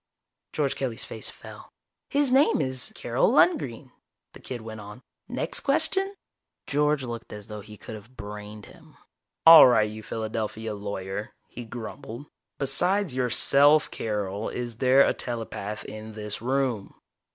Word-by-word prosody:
George -, -, 0 dB
Kelly's -, -, -3 dB
face -, -, -4 dB
fell. -, -, -12 dB, 0.4 s
"His 285 Hz, -2 st, +1 dB
name 270 Hz, +3 st, +4 dB
is 130 Hz, -, -1 dB
Carol -, -, +1 dB
Lundgren," 130 Hz, -, +2 dB, 0.4 s
the -, -, -12 dB
kid 125 Hz, -3 st, -6 dB
went 110 Hz, -1 st, -8 dB
on. 105 Hz, +5 st, -11 dB, 0.2 s
"Next -, -, -2 dB
question?" 390 Hz, +1 st, 0 dB, 0.5 s
George 150 Hz, 0 st, +1 dB
looked 120 Hz, -2 st, -6 dB
as 105 Hz, -1 st, -7 dB
though 105 Hz, 0 st, -8 dB
he 105 Hz, +1 st, -12 dB
could -, -, -9 dB
have 110 Hz, +4 st, -12 dB
brained 105 Hz, 0 st, -8 dB
him. -, -, -18 dB, 0.5 s
"All 165 Hz, -4 st, +11 dB
right, 110 Hz, -4 st, +4 dB
you 110 Hz, +1 st, -8 dB
Philadelphia 110 Hz, 0 st, -4 dB
lawyer," 100 Hz, 0 st, -5 dB, 0.2 s
he 120 Hz, -, -8 dB
grumbled. 120 Hz, +3 st, -8 dB, 0.3 s
"Besides 175 Hz, +5 st, +1 dB
yourself, 140 Hz, +4 st, +4 dB
Carol, 105 Hz, -1 st, -3 dB
is 120 Hz, -2 st, -5 dB
there 130 Hz, +2 st, +5 dB
a -, -, +2 dB
telepath 110 Hz, -3 st, -5 dB
in 110 Hz, 0 st, -8 dB
this 105 Hz, -1 st, -5 dB
room?" 125 Hz, -5 st, -1 dB
115 Hz, 140 wpm, -26 LUFS, 105-135 Hz, 0.5 s, All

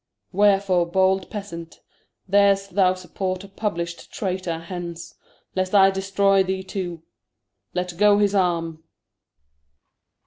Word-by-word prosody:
Wherefore 195 Hz, -3 st, +3 dB
bold 190 Hz, +2 st, +1 dB
Peasant, 170 Hz, -6 st, -8 dB, 0.5 s
Dar'st 195 Hz, 0 st, +3 dB
thou 185 Hz, -1 st, +3 dB
support 185 Hz, +1 st, -4 dB
a -, -, -10 dB
publisht 170 Hz, -4 st, -4 dB
Traytor? 185 Hz, -4 st, -3 dB
Hence, 170 Hz, 0 st, -7 dB, 0.4 s
Lest 185 Hz, +1 st, 0 dB
I 195 Hz, -1 st, +7 dB
destroy 195 Hz, 0 st, +2 dB
thee 190 Hz, 0 st, -2 dB
too. 175 Hz, -4 st, -5 dB, 0.7 s
Let 180 Hz, -1 st, -2 dB
go 205 Hz, 0 st, +6 dB
his 205 Hz, -1 st, +2 dB
Arm. 165 Hz, -4 st, 0 dB
190 Hz, 110 wpm, -23 LUFS, 175-195 Hz, 0.7 s, I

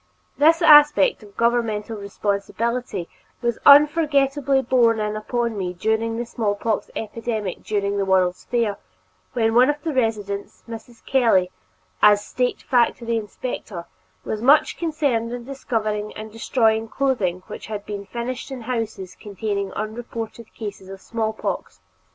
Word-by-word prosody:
This 325 Hz, +4 st, +4 dB
aspect 295 Hz, -, +6 dB
of 205 Hz, -2 st, -16 dB
governmental 230 Hz, -2 st, 0 dB
responsibility 205 Hz, +1 st, -3 dB, 0.3 s
was 235 Hz, -2 st, -1 dB
unforgettably 285 Hz, -2 st, +5 dB
borne 235 Hz, -3 st, +3 dB
in 210 Hz, 0 st, -2 dB
upon 235 Hz, +1 st, -2 dB
me 185 Hz, -3 st, -3 dB
during 220 Hz, +4 st, 0 dB
the 240 Hz, -, -3 dB
smallpox 220 Hz, -1 st, -2 dB
epidemic 220 Hz, -3 st, -4 dB
following 200 Hz, -1 st, -1 dB
the 195 Hz, -, +1 dB
World's 185 Hz, -1 st, +1 dB
Fair, 230 Hz, -4 st, 0 dB, 0.6 s
when 225 Hz, -2 st, +1 dB
one 250 Hz, +4 st, +5 dB
of 295 Hz, 0 st, -2 dB
the 320 Hz, -2 st, -2 dB
residents, 210 Hz, -5 st, -2 dB
Mrs. 230 Hz, 0 st, -10 dB
Kelley, 225 Hz, -9 st, +3 dB, 0.5 s
as 205 Hz, 0 st, +5 dB
State 250 Hz, -1 st, -2 dB
Factory 235 Hz, -2 st, +1 dB
Inspector, 210 Hz, -4 st, -5 dB, 0.4 s
was 215 Hz, -, -3 dB
much 280 Hz, +5 st, +4 dB
concerned 285 Hz, -9 st, -1 dB
in 245 Hz, -1 st, -6 dB
discovering 215 Hz, -6 st, -3 dB
and 215 Hz, 0 st, -8 dB
destroying 225 Hz, 0 st, +1 dB
clothing 215 Hz, -9 st, -1 dB
which -, -, -9 dB
was 210 Hz, -2 st, -4 dB
being 200 Hz, -1 st, -6 dB
finished 245 Hz, +3 st, -5 dB
in 265 Hz, -2 st, -6 dB
houses 225 Hz, -6 st, -4 dB
containing 200 Hz, -1 st, -4 dB
unreported 225 Hz, +1 st, -6 dB
cases 200 Hz, -3 st, -7 dB
of 195 Hz, 0 st, -9 dB
smallpox. 220 Hz, -, -4 dB
225 Hz, 135 wpm, -22 LUFS, 210-250 Hz, 0.6 s, aspect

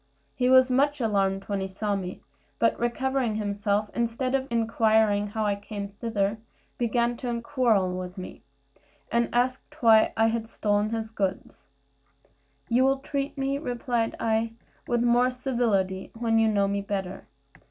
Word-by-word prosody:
He 250 Hz, 0 st, +1 dB
was 260 Hz, 0 st, +6 dB
much 285 Hz, +3 st, +2 dB
alarmed 195 Hz, -4 st, +1 dB
when 200 Hz, 0 st, -3 dB
he 190 Hz, -, -2 dB
saw 200 Hz, +2 st, -2 dB
me; 185 Hz, -2 st, -6 dB, 0.3 s
but 230 Hz, -, +2 dB
recovering 245 Hz, -1 st, 0 dB
himself, 205 Hz, 0 st, -1 dB
instead 235 Hz, +2 st, -1 dB
of 270 Hz, 0 st, 0 dB
inquiring 220 Hz, -2 st, +2 dB
how 215 Hz, +1 st, -2 dB
I 205 Hz, -, +2 dB
came 200 Hz, 0 st, -6 dB
thither, 205 Hz, 0 st, -2 dB, 0.4 s
began 240 Hz, 0 st, +1 dB
to 240 Hz, -1 st, -3 dB
quarrel 230 Hz, -10 st, +1 dB
with 185 Hz, 0 st, -6 dB
me, 185 Hz, -, -8 dB, 0.7 s
and 235 Hz, 0 st, +2 dB
asked 255 Hz, +2 st, -1 dB
why 225 Hz, -2 st, +5 dB
I 225 Hz, +1 st, +2 dB
stole 205 Hz, -2 st, 0 dB
his 225 Hz, -1 st, -3 dB
goods. 195 Hz, -3 st, -4 dB, 1.0 s
"You 245 Hz, +2 st, +3 dB
will 270 Hz, +1 st, +3 dB
treat 275 Hz, +1 st, -4 dB
me," 275 Hz, +1 st, -1 dB
replied 240 Hz, -4 st, -2 dB
I, 225 Hz, 0 st, 0 dB, 0.3 s
"with 240 Hz, -1 st, +1 dB
more 240 Hz, +1 st, +4 dB
civility, 235 Hz, -7 st, -1 dB
when 225 Hz, -1 st, +2 dB
you 225 Hz, -, +4 dB
know 200 Hz, -2 st, +2 dB
me 200 Hz, 0 st, -1 dB
better. 195 Hz, -2 st, -4 dB
225 Hz, 150 wpm, -26 LUFS, 205-245 Hz, 1.0 s, was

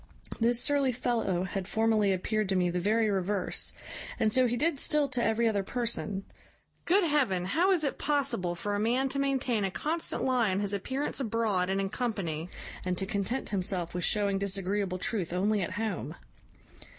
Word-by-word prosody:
This 235 Hz, +1 st, +3 dB
surly 280 Hz, -1 st, +2 dB
fellow 225 Hz, -7 st, 0 dB
had 190 Hz, 0 st, -4 dB
formerly 220 Hz, -2 st, +2 dB
appeared 210 Hz, +2 st, 0 dB
to 190 Hz, -, +2 dB
me 180 Hz, -1 st, +2 dB
the 180 Hz, -, -1 dB
very 215 Hz, +4 st, +2 dB
reverse, 195 Hz, -1 st, 0 dB, 0.5 s
and 215 Hz, -, +2 dB
so 255 Hz, -1 st, +5 dB
he 240 Hz, +1 st, -1 dB
did 305 Hz, +2 st, +1 dB
still 300 Hz, -1 st, +2 dB
to 250 Hz, -2 st, 0 dB
every 230 Hz, +1 st, +2 dB
other 205 Hz, -3 st, +1 dB
person. 210 Hz, -3 st, -1 dB, 0.6 s
Good 385 Hz, +3 st, +4 dB
heaven! 260 Hz, -, +1 dB
how 340 Hz, -, +2 dB
is 350 Hz, -5 st, +2 dB
it 280 Hz, -, -1 dB
possible 275 Hz, -12 st, 0 dB
for 205 Hz, +4 st, -3 dB
a 205 Hz, -, 0 dB
man 245 Hz, +5 st, +1 dB
to 275 Hz, -, -2 dB
maintain 260 Hz, -5 st, +1 dB
a 195 Hz, -, +1 dB
constant 320 Hz, -, -2 dB
lie 250 Hz, -5 st, +2 dB
in 190 Hz, +1 st, 0 dB
his 205 Hz, 0 st, -1 dB
appearance 260 Hz, +11 st, -2 dB
abroad 220 Hz, -7 st, 0 dB
and 195 Hz, +1 st, +1 dB
in 195 Hz, 0 st, -1 dB
company, 190 Hz, -9 st, -3 dB, 0.3 s
and 180 Hz, -1 st, -1 dB
to 190 Hz, -, -1 dB
content 200 Hz, +6 st, -2 dB
himself 180 Hz, -3 st, -2 dB
with 180 Hz, 0 st, -3 dB
shewing 200 Hz, -2 st, +1 dB
disagreeable 195 Hz, -1 st, -1 dB
truth 180 Hz, -2 st, -2 dB
only 200 Hz, +3 st, +1 dB
at 180 Hz, -, -3 dB
home? 195 Hz, -, -3 dB
210 Hz, 185 wpm, -29 LUFS, 190-250 Hz, 0.6 s, so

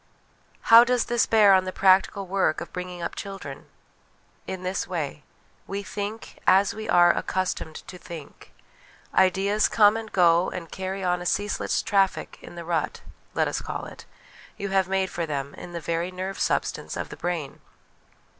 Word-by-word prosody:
How 230 Hz, +1 st, +12 dB
does 245 Hz, -1 st, +1 dB
this 240 Hz, 0 st, +1 dB
bear 210 Hz, -3 st, +6 dB
on 185 Hz, 0 st, +4 dB
the 185 Hz, -, -3 dB
practical 195 Hz, +1 st, +3 dB
work 190 Hz, -3 st, +1 dB
of 170 Hz, -, -9 dB
bring 180 Hz, 0 st, -5 dB
ing 175 Hz, -1 st, -7 dB
up -, -, -3 dB
children? 195 Hz, -9 st, -8 dB, 0.8 s
In 190 Hz, -1 st, -5 dB
this 185 Hz, +1 st, -2 dB
way: 150 Hz, -5 st, -4 dB, 0.5 s
We 200 Hz, +1 st, -4 dB
think, 205 Hz, +3 st, -6 dB
as 195 Hz, +1 st, +5 dB
rir 215 Hz, +1 st, -7 dB
are 175 Hz, 0 st, +6 dB
accustomed 185 Hz, -4 st, -2 dB
to 180 Hz, -, -9 dB
think; 165 Hz, -6 st, -11 dB, 0.6 s
ideas 195 Hz, +3 st, +3 dB
come 210 Hz, -1 st, +5 dB
and 225 Hz, -1 st, -5 dB
go 175 Hz, -1 st, +4 dB
and 170 Hz, -3 st, -7 dB
carry 190 Hz, +1 st, -4 dB
on 180 Hz, -1 st, 0 dB
a -, -, -6 dB
ceaseless 205 Hz, +3 st, 0 dB
traffic 195 Hz, -2 st, 0 dB
in -, -, -11 dB
the 170 Hz, -1 st, -7 dB
rut 165 Hz, -3 st, -2 dB, 0.3 s
let -, -, +2 dB
us -, -, -2 dB
call -, -, -5 dB
it -, -, -11 dB, 0.5 s
you 200 Hz, -, -4 dB
have 190 Hz, -1 st, +2 dB
made 190 Hz, 0 st, 0 dB
for 170 Hz, -1 st, -3 dB
them 140 Hz, -2 st, -4 dB
in 175 Hz, -, -10 dB
the 170 Hz, -, -4 dB
very 170 Hz, +2 st, -2 dB
nerve 185 Hz, +1 st, -5 dB
substance -, -, -1 dB
of -, -, -4 dB
the -, -, -8 dB
brain. 170 Hz, -6 st, -4 dB
185 Hz, 175 wpm, -25 LUFS, 175-200 Hz, 0.8 s, How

